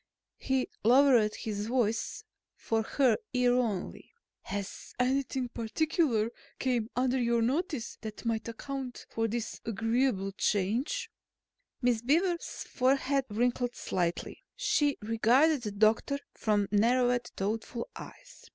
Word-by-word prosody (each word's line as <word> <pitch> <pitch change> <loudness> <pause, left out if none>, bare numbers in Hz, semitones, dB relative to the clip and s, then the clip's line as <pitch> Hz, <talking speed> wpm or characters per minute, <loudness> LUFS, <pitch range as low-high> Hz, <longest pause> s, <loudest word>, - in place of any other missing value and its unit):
He 265 -1 0 0.2
lowered 240 -2 +5
his 210 -1 -4
voice 230 -2 0 0.3
for 225 -1 -1
her 255 +3 +2 0.2
ear 250 -1 +3
only. 230 -7 -2 0.3
"Has 200 0 -6
anything 260 0 0
particular 235 -1 0 0.3
come 240 -4 0
under 255 +1 +1
your 235 -1 +2
notice 280 - -2
that 220 +1 -7
might 230 -1 -1
account 255 +2 -6
for 225 0 0
this 225 0 -4
agreeable 225 -2 0
change?" 220 - 0 0.7
Miss 240 -2 +2
Beaver's 340 +7 0
forehead 270 +1 +1
wrinkled 245 +3 0
slightly. 175 -2 -2
She 295 - +1
regarded 245 +7 +3
the 210 -3 -4
doctor 220 +7 +2 0.2
from 205 -2 +1
narrowed, 245 +3 +3
thoughtful 220 +4 -3
eyes. - - -12
240 Hz, 115 wpm, -30 LUFS, 220-265 Hz, 0.7 s, lowered